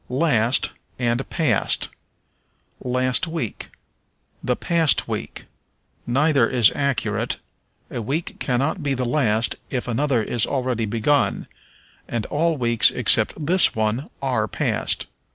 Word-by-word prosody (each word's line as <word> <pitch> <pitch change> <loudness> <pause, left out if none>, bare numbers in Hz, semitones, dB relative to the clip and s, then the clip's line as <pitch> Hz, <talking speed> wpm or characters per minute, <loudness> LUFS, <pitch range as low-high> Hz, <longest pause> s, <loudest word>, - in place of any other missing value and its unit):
Last 125 -3 +2 0.3
and 120 +1 -1
Past. 150 - +1 0.9
"Last 130 +5 0
week." 160 -10 -5 0.7
"The 125 - 0
past 165 -2 +2
week." - - -5 0.6
Neither 140 -1 +3
is 120 -5 +4
accurate: 140 -3 -1 0.6
a - - -4
week 145 +10 -3
cannot 140 +8 -1
be 140 -2 -1
the 125 0 -2
last 120 -4 +1
if 125 -2 -3
another 125 0 +1
is 115 0 0
already 125 -4 -1
begun; 115 +7 +1 0.6
and 115 -2 -3
all 165 +1 +1
weeks 120 -2 +5
except 155 - +2
this 180 +4 +4
one 110 +6 -1
are 125 -5 0
past. - - -1
125 Hz, 115 wpm, -22 LUFS, 115-145 Hz, 0.9 s, weeks